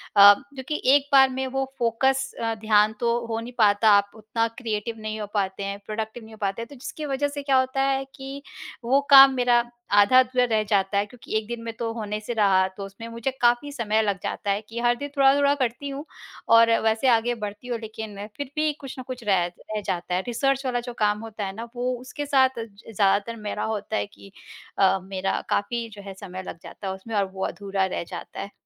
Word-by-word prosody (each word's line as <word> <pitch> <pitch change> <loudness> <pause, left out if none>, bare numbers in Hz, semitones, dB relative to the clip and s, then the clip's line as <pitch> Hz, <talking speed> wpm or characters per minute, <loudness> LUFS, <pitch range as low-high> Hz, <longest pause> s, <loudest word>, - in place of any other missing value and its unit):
अ, 200 0 +10
क्योंकि 280 +3 -6
एक 285 -1 +2
बार 270 -1 +7
में 265 0 -3
वो 270 +1 -1
फ़ोकस 265 +3 +1
अ, 225 0 0
ध्यान 215 0 +3
तो 235 0 +1
हो 225 -1 -3
नहीं 240 +2 -8
पाता, 210 -1 +4
आप 200 0 +4
उतना 220 +1 -1
क्रिएटिव 225 -2 -3
नहीं 215 0 -5
हो 210 - -4
पाते 195 -1 -1
हैं, 200 0 -4
प्रोडक्टिव 220 +2 -5
नहीं 220 0 -13
हो - - -12
पाते 200 +3 -1
हैं, 230 - -6
तो 285 - -11
जिसकी 295 +4 -7
वजह 285 +1 0
से 285 0 -6
क्या 275 -2 +3
होता 260 +1 0
है 270 0 +1
कि 270 +1 -8 0.4
वो 270 +4 +3
काम 270 -1 +10
मेरा 245 -1 +3 0.4
आधा-अधूरा 255 +3 +5
रह 220 -2 +1
जाता 200 -1 +1
है, 200 - +2
क्योंकि 235 0 -11
1 215 - -4
दिन 235 0 -5
में 230 -1 -5
तो 230 -1 -2
होने 210 -2 -4
से 220 +3 -5
रहा। 195 -3 +3
तो 200 - -5
उसमें 200 +4 -10
मुझे 230 +3 -3
काफ़ी 240 +4 +3
समय 220 -4 0
लग 200 -3 -1
जाता 200 - -2
है 200 +2 0
कि 230 +1 -5
हर 240 0 +3
दिन 285 +3 -5
थोड़ा-थोड़ा 280 +1 +5
करती 260 +1 -2
हूँ 280 +3 -6 0.5
और 230 0 +6
वैसे 220 +4 +2
आगे 235 +1 +2
बढ़ती 210 +2 -7
हूँ, 240 -2 -2
लेकिन 220 -1 -7 0.2
फिर 285 -1 -5
भी 305 0 +2
कुछ 270 -1 -8
ना 255 - -6
कुछ 255 -2 -6
रह 190 -4 +2
रह 210 +4 -6
जाता 180 0 -3
है। 185 - +1
रिसर्च 270 +3 0
वाला 245 -1 0
जो 245 - -5
काम 210 0 +2
होता 215 -2 -5
है 195 - -5
ना, 230 +1 -6
वो 250 +1 -1
उसके 275 +3 -6
साथ 265 -3 +3
ज 225 - -6 0.3
ज़्यादातर 205 +3 +2
मेरा 210 -2 -4
होता 215 0 -3
है - - -1
कि 200 -1 -16 0.5
अ, 195 0 +4
मेरा 190 0 -2
काफ़ी 235 +3 -1
जो 205 -1 -11
है, 195 -1 -8
समय 185 0 -8
लग 170 - -8
जाता 195 - -8
है 190 - -2
उसमें 210 +3 -7
और 200 - +2
वो 190 0 -3
अधूरा 195 -1 -2
रह 185 - -3
जाता - - -8
है। 200 - -7
230 Hz, 230 wpm, -25 LUFS, 205-260 Hz, 0.5 s, अ